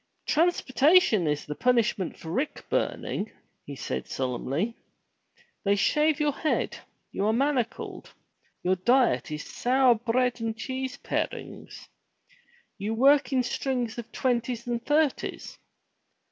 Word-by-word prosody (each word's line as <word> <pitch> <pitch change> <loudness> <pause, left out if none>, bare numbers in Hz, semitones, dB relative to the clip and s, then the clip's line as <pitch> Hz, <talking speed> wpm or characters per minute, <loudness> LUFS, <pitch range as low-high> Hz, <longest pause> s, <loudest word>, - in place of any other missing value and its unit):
"Transportation 305 - +3
is 150 0 -1
the 150 - -4
punishment 235 -2 +1
for 160 - -8
rick 265 - -2
burning," 205 +2 -1 0.4
he 140 - -6
said 65 - -4
solemnly. 135 - -2 0.9
"They 200 0 +3
shave 300 +9 +2
your 300 -1 +2
head. 305 +2 -1 0.4
You 200 - -1
are 220 - +3
manacled. 260 -2 -1 0.5
Your 185 +1 +2
diet 245 +4 +3
is 150 0 -5
sour 255 0 +3
bread 245 +2 0
and 225 -1 -2
cheese 260 +3 -4
parings. - - -5 0.9
You 210 +3 -2
work 275 +4 +4
in 260 -2 +2
strings 245 -1 -2
of 235 - -8
twenties 240 -2 -1
and 240 -1 -2
thirties. 295 -1 0
240 Hz, 120 wpm, -27 LUFS, 205-270 Hz, 0.9 s, work